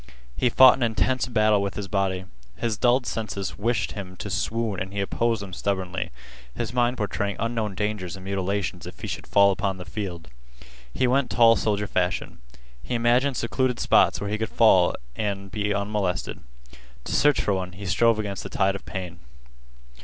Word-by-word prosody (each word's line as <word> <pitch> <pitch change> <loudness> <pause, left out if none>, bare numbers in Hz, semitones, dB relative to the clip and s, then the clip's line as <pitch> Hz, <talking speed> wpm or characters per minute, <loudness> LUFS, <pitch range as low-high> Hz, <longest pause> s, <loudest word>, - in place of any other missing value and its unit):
He 125 - +2
fought 130 +1 +8
an - - -9
intense 120 +2 +1
battle 110 -4 +3
with 100 -1 -3
his 100 -1 -4
body. 95 -2 -1 0.3
His 115 -2 -1
dulled 125 +4 +2
senses 105 -5 -4
wished 105 -3 0
him 95 -3 -7
to 105 - -6
swoon 105 0 -1
and 95 0 -4
he 100 - -4
opposed 115 +2 0
them 95 -2 -9
stubbornly, 95 -1 -2 0.5
his 120 -1 -3
mind 125 0 +1
portraying 100 -1 -2
unknown 115 -3 -2
dangers 105 -4 -3
and 95 0 -11
mutilations 95 -2 -2
if 90 - -10
he - - -6
should - - -5
fall 100 0 +5
upon 95 0 -2
the 90 - -8
field. 90 -5 -6 0.6
He 130 - 0
went 130 +1 +2
tall 115 0 +6
soldier 105 -1 0
fashion. 90 -2 -2 0.4
He 125 - -3
imagined 120 +3 +2
secluded 125 +1 0
spots - - +4
where 100 0 -4
he 110 - -1
could 110 - -2
fall 95 -6 +4 0.2
and 100 0 -3
be 105 +1 -1
unmolested. 100 -2 -2 0.6
To - - -5
search 145 -1 +4
for 100 - +1
one 90 -1 -3
he 100 +3 -9
strove 115 +4 +3
against 100 -3 -3
the - - -7
tide 95 0 +1
of 100 - -8
pain. 90 -3 -6
100 Hz, 185 wpm, -25 LUFS, 95-115 Hz, 0.6 s, fought